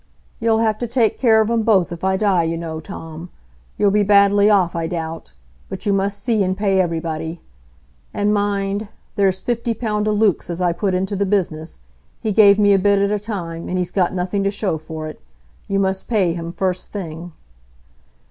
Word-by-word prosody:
"You'll 225 -1 +2
have 220 -1 +1
to 240 - -2
take 230 -2 +1
care 220 -4 +5
of 220 +1 0
'em 230 -1 +2
both 200 -7 +2
if 170 +1 -7
I 190 0 +2
die, 195 -4 +2
you 165 0 -1
know, 160 -1 -5
Tom. 165 +2 -9 0.5
You'll 205 -1 +3
be 210 +1 +3
badly 200 0 +5
off, 185 -5 +3
I 165 -1 -1
doubt. 165 -1 -5 0.4
But 190 +1 -6
you 205 - +2
must 195 +1 0
see 215 +1 0
and 185 0 0
pay 195 -2 +2
everybody. 165 -1 -3 0.7
And 205 +1 0
mind,—there's 200 -1 -1
fifty 235 -1 -2
pound 210 -2 -1
o' - - +2
Luke's 210 -4 +1
as 170 0 -4
I 180 -1 +2
put 190 +2 -1
into 190 +2 -1
the 200 0 0
business,—he 155 - -4
gave 200 -1 +6
me 205 -1 +4
a 195 - +4
bit 200 +1 +3
at 200 +1 +1
a 210 - 0
time, 175 -6 -5
and 185 - -1
he's 180 -1 -2
got 180 -3 +1
nothing 185 +2 -2
to 195 - +2
show 200 -5 -2
for 155 0 -7
it. 155 - -10 0.5
You 195 - 0
must 190 -1 -1
pay 195 -7 +1
him 170 0 -5
first 185 +1 -2
thing." 170 -3 -7
195 Hz, 195 wpm, -20 LUFS, 170-210 Hz, 0.7 s, gave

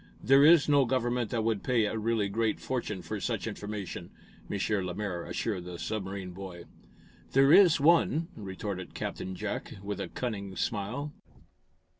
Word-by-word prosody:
"There 135 +2 +6
is 160 0 +7
no 145 -2 +5
government 120 -2 0
that 115 -2 -1
would 110 -3 0
pay 120 -4 +2
a 105 - -2
really 110 -1 0
great 110 +2 0
fortune 105 -7 -3
for - - -4
such - - -2
information,". 105 -2 -5 0.4
M. 100 - -2 0.3
Lemaire 90 -1 -3
assured 95 -6 -3
the 90 -1 -7
submarine 95 -2 -4
boy. 90 -2 -8 0.7
"There 135 +3 +6
is 185 -7 +7
one," 165 +1 +4
retorted 95 -2 -6
Captain 95 - -4
Jack, - - -4
with 100 0 -4
a - - -3
cunning 100 -6 -4
smile. 115 +11 -2
110 Hz, 150 wpm, -30 LUFS, 95-130 Hz, 0.7 s, is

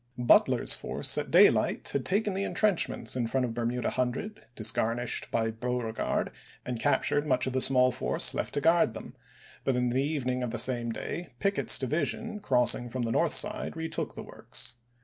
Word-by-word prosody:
Butler's 120 -1 +3
force - - +1
at - - -5
daylight - - +3
had 140 - -2
taken 205 +1 0
the 195 +1 -2
intrenchments 205 -9 0
in 120 -2 -1
front 130 +2 0
of 115 - -5
Bermuda 120 +1 -2
Hundred 130 - -3
disgarnished 115 +2 -1
by 115 -1 -1
Beauregard, 115 0 -3 0.3
and 125 -2 -4
captured 145 +2 +1
much 130 -2 +2
of 130 - -3
the 130 - +1
small 130 -1 +5
force - - 0
left - - -3
to 145 - 0
guard 165 -8 +3
them; 125 - -9 0.5
but 135 - 0
in 125 0 0
the 130 +2 +1
evening 130 -4 -2
of 125 - -2
the 120 - -4
same 120 -2 +3
day 160 +3 -6
Pickett's 200 +6 +2
division, 170 - -2
crossing 125 - +2
from 125 +1 -3
the 115 - -2
north 165 +6 +1
side, 210 -5 -1
retook 160 0 -3
the - - -7
works. - - -7
125 Hz, 180 wpm, -28 LUFS, 120-160 Hz, 0.5 s, small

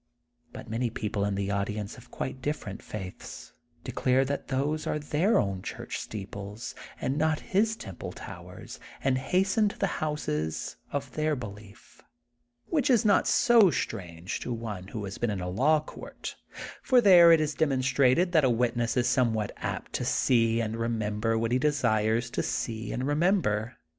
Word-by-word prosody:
But - - -9
many 115 +2 -1
people 105 -2 -2
in 100 -1 -1
the 100 0 -2
audience 105 +1 -2
of 125 - -15
quite 130 0 -5
different 135 -8 -4
faiths 95 -4 -8 0.3
declare 130 +1 +1
that 140 +1 -3
those 145 +3 -1
are - - 0
their 150 +8 +1
own 95 -2 0
church - - -5
steeples 105 +1 -7 0.3
and 140 +3 -1
not 155 0 +1
his 220 +3 +3
temple 95 - -7
towers, - - -10 0.2
and 130 -1 +2
hasten 190 +8 +2
to - - -11
the 195 - -2
houses 80 - -2
of 140 -2 -3
their 155 0 0
belief. 105 -3 -11 0.6
Which 290 -6 0
is 240 -3 +4
not 205 -2 +4
so 235 -6 +6
strange, 90 - -4
to - - -5
one 110 -5 -5
who 105 0 -5
has 95 - -7
been 120 - 0
in 100 -2 -2
a 90 - -4
law 140 +12 +3
court, 155 - -8 0.5
for 255 -2 +4
there 180 -6 +8
it 165 - +7
is 155 -1 0
demonstrated 135 +3 +2
that 160 -4 +4
a 130 - +4
witness 120 0 0
is 120 - +2
somewhat 110 -5 +1
apt - - -5
to - - -1
see 115 -2 +2
and 110 0 -3
remember 115 -1 -1
what 115 +1 -1
he 125 - +3
desires 115 -5 +1
to - - -1
see 115 -1 -3
and 125 - -2
remember. 145 - +1
125 Hz, 170 wpm, -28 LUFS, 105-150 Hz, 0.6 s, there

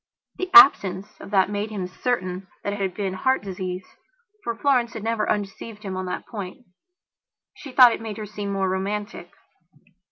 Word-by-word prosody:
The 370 - -2
absence 195 - +8 0.2
of - - -10
that 195 0 +2
made 205 +1 -2
him 200 -4 -4
certain 185 -2 -3 0.2
that 200 - -2
it 205 - -5
had 190 -2 -2
been 195 -3 -2
heart 260 +5 +1
disease. 185 -1 -5 0.6
For 235 - -3
Florence 245 -2 +1
had 225 - -7
never 225 -1 -1
undeceived 210 +2 -4
him 190 -2 -5
on 185 0 -4
that 180 - -4
point. 200 -5 -8 0.9
She 275 - -11
thought 250 -2 +7
it - - -6
made 220 -2 -6
her 215 - -5
seem 205 -1 -5
more 195 -1 0
romantic. 195 -1 -3
205 Hz, 180 wpm, -24 LUFS, 190-225 Hz, 0.9 s, absence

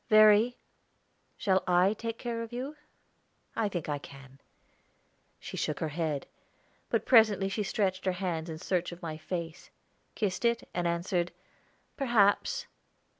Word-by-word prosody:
"Verry, 215 +2 +6 0.8
shall 190 -1 +2
I 180 +3 +4
take 230 +1 -5
care 235 -2 -3
of 230 0 -6
you? 260 +5 -5 0.8
I 220 -2 +1
think 175 -5 -4
I 145 -1 -1
can." 135 -1 -13 1.0
She - - -7
shook 150 - -1
her 160 - -1
head; 155 -2 -2 0.6
but - - 0
presently 215 -5 +5
she 210 - -2
stretched 195 -2 -1
her 185 - +2
hands 170 -3 -2
in 160 - -5
search 180 +1 -1
of 175 +1 -11
my 160 -2 -4
face, 170 0 -5 0.5
kissed 200 -1 -1
it, 235 0 +1
and 175 -1 0
answered, 175 +1 0 0.7
"Perhaps." 240 - +3
190 Hz, 140 wpm, -30 LUFS, 170-220 Hz, 1.0 s, Verry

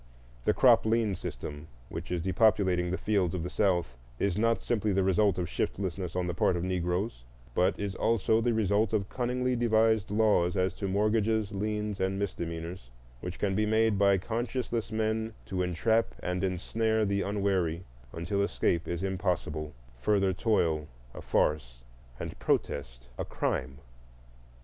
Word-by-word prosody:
The - - +4
crop - - +6
lien 110 -2 +2
system 75 -4 -6 0.2
which - - -6
is 90 -2 -1
depopulating 95 -2 +3
the 90 - -1
fields 95 -4 +1
of 85 - -3
the 90 - -4
South 85 - 0 0.2
is 100 +3 0
not 115 +2 +2
simply 110 -3 0
the 95 0 +2
result 95 +1 +3
of 90 -1 -1
shiftlessness 90 -1 -3
on 90 -1 0
the 90 - -2
part 85 +1 +2
of 85 - -3
Negroes, 90 - -1 0.3
but 90 +8 +2
is 100 -1 -2
also 110 +1 +2
the 120 +1 +2
result 105 0 +2
of 100 -2 0
cunningly 125 0 -1
devised 110 -2 +3
laws 105 -4 +2
as 90 -1 +1
to 100 - -4
mortgages, 105 +1 +1
liens, 105 0 -2
and 95 +1 0
misdemeanors, 85 -6 -4 0.3
which 90 +7 -6
can 100 -2 0
be 105 +2 +1
made 110 -1 +2
by 100 -1 +5
conscienceless 115 +2 -2
men 110 0 -1
to 95 -1 -2
entrap 100 +6 +1
and 90 0 -1
snare 110 +2 +1
the 100 0 0
unwary 95 -5 0 0.3
until 85 +5 -2
escape 85 -4 0
is 85 +1 -3
impossible, 90 -6 -2 0.3
further 95 +7 +2
toil 85 -7 +1 0.3
a - - -8
farce, - - 0 0.4
and - - -6
protest - - -1
a - - 0
crime. 65 +1 -2
95 Hz, 155 wpm, -29 LUFS, 90-110 Hz, 0.4 s, crop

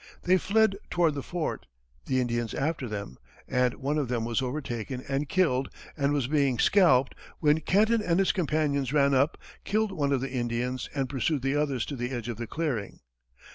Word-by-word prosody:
They 185 +1 +4
fled 215 0 +2
toward 170 -3 +2
the 140 - -4
fort, 175 +2 -4 0.4
the 130 -1 +1
Indians 120 -2 -1
after 150 -2 -1
them, 100 - -6 0.3
and 125 0 +1
one 145 +2 -1
of 140 - -1
them 120 -2 -1
was 115 +2 0
overtaken 125 -2 -4
and 140 +1 -1
killed 140 -9 +2 0.3
and 140 -2 +1
was 145 -4 +1
being 140 -2 +1
scalped, 135 - +4 0.3
when 150 0 +3
Kenton 215 +6 +3
and 170 -4 +1
his 195 -1 +3
companions 150 -6 0
ran 140 -2 +4
up, 140 +4 +2 0.3
killed 215 0 0
one 145 -6 -1
of 135 -3 +1
the 135 - -4
Indians 125 0 -2
and 135 -2 0
pursued 135 +1 -1
the 135 +1 +1
others 140 -5 0
to 145 - -5
the 125 -1 -3
edge 120 -3 -4
of 115 - -4
the 120 0 -5
clearing. 135 -11 -3
140 Hz, 190 wpm, -28 LUFS, 125-155 Hz, 0.4 s, They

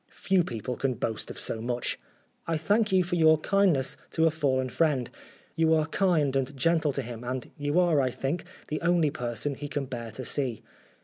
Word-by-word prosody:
Few 190 -2 +1
people 120 - -4
can 135 -2 0
boast 110 -2 -3
of - - -6
so 110 - -1
much. 120 +1 -2 0.2
" - - -40
I 165 -1 +1
thank 205 +7 +1
you 185 -1 +4
for 175 0 -2
your 160 -1 +6
kindness 175 -6 +2
to 160 - +2
a 165 - +4
fallen 130 -4 0
friend; 140 -4 +1 0.4
you 160 0 +4
are 155 -1 +2
kind 160 -5 +1
and 135 +1 -1
gentle 160 +1 +2
to 135 - -2
him, 120 0 -7
and 125 0 -4
you 145 +3 0
are, 170 -5 +4
I 130 - +1
think, 135 +7 -3 0.3
the 155 - -2
only 170 -3 +3
person 125 0 -3
he 145 +2 -6
can 145 -1 -3
bear 120 -3 -6
to 130 +3 -6
see. 125 -6 -1
145 Hz, 205 wpm, -28 LUFS, 130-165 Hz, 0.4 s, your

